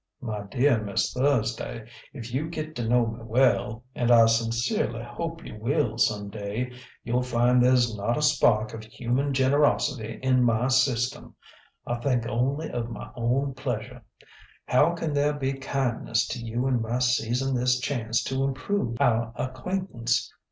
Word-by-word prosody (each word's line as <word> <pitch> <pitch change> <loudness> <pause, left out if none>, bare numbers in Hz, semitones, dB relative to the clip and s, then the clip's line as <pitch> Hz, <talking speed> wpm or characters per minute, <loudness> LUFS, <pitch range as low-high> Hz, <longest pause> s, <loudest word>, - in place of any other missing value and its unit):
"My 110 -6 -4
dear 120 +3 +2
Miss 100 -2 -1
Thursday, 115 -4 -1 0.2
if 120 -4 -8
you 150 +5 -1
get 155 -1 -5
to 120 -2 -2
know 120 0 +4
me 115 0 -5
well 115 -1 +1
and 120 -1 -1
I 115 -2 +8
sincerely 115 - 0
hope 165 +8 -6
you 110 - -9
will 120 -2 0
some 105 -2 +1
day 110 +5 -4 0.3
you'll 120 +2 0
find 125 0 +3
there's 125 -3 +3
not 105 +4 -1
a - - -1
spark 115 -7 +3
of 110 -1 -7
human 125 +5 -1
generosity 135 -3 +1
in 130 -1 +3
my 120 +1 +2
system. 125 -2 +1 0.5
I 120 0 -2
think 120 -2 0
only 135 +7 -1
of 120 -1 -3
my 115 - -8
own 130 +4 0
pleasure. 125 -5 -5 0.6
How 150 +7 +3
can 160 -3 -3
there 145 +1 +2
be 135 -2 -2
kindness 130 -4 -1
to - - -4
you 115 +2 -2
in 130 -3 +1
my 115 +2 -1
seizing 125 +1 +1
this 125 0 +2
chance 115 -3 -1
to 135 0 -1
improve 135 - -2
our 115 -1 +2
acquaintance? 130 - -2
125 Hz, 160 wpm, -26 LUFS, 115-135 Hz, 0.6 s, I